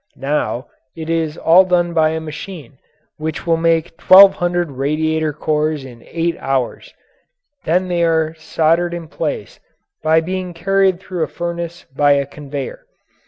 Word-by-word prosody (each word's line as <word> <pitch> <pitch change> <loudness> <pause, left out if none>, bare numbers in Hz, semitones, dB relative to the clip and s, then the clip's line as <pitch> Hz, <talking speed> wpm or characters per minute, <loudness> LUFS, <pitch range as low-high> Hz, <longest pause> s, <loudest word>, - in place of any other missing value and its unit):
Now 135 -2 -2 0.3
it 160 0 -5
is 160 -2 -1
all 170 +3 +6
done 175 -2 +1
by 160 -1 +3
a 160 0 -2
machine 155 -3 -9 0.4
which 155 0 -4
will 165 -1 +3
make 165 0 0
twelve 195 +1 +8
hundred 175 -2 -1
radiator 155 +3 -1
cores 150 -1 -1
in 120 -3 -12
eight 170 0 -1
hours; 135 -3 -2 0.7
then 180 +3 +1
they 175 -1 0
are 160 -1 +1
soldered 165 +2 0
in 170 -2 -7
place - - -4 0.4
by 160 +1 +4
being 180 +1 -4
carried 195 +1 +2
through 185 -2 -6
a 160 - +1
furnace 170 0 -5
by 145 0 +4
a 140 0 +1
conveyor. 140 - -7
160 Hz, 150 wpm, -18 LUFS, 150-175 Hz, 0.7 s, twelve